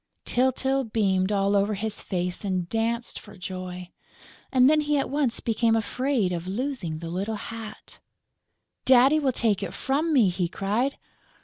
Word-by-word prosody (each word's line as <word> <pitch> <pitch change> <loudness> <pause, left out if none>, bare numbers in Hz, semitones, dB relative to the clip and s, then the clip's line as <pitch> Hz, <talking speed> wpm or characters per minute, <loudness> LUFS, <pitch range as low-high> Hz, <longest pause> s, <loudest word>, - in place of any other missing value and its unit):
Tyltyl 265 +1 +1
beamed 190 -3 +1
all 200 0 +2
over 200 +1 +2
his 215 +1 -3
face 180 0 -3
and 185 -3 -1
danced 230 +3 -1
for 205 -2 -14
joy; 180 -1 -6 0.6
and 255 -1 +5
then 305 +1 +4
he 295 0 +1
at 275 - -1
once 275 -5 +1
became 225 0 +1
afraid 225 -1 0
of 175 0 -4
losing 205 - -3
the 165 +1 -6
little 200 +5 -2
hat: 220 0 -9 0.8
"Daddy 265 +4 +6
will 275 -3 +1
take 220 -5 +1
it 195 -1 -5
from 295 +5 0
me!" 245 -10 +5
he 180 0 -1
cried. 215 +10 -1
220 Hz, 155 wpm, -26 LUFS, 190-260 Hz, 0.8 s, Daddy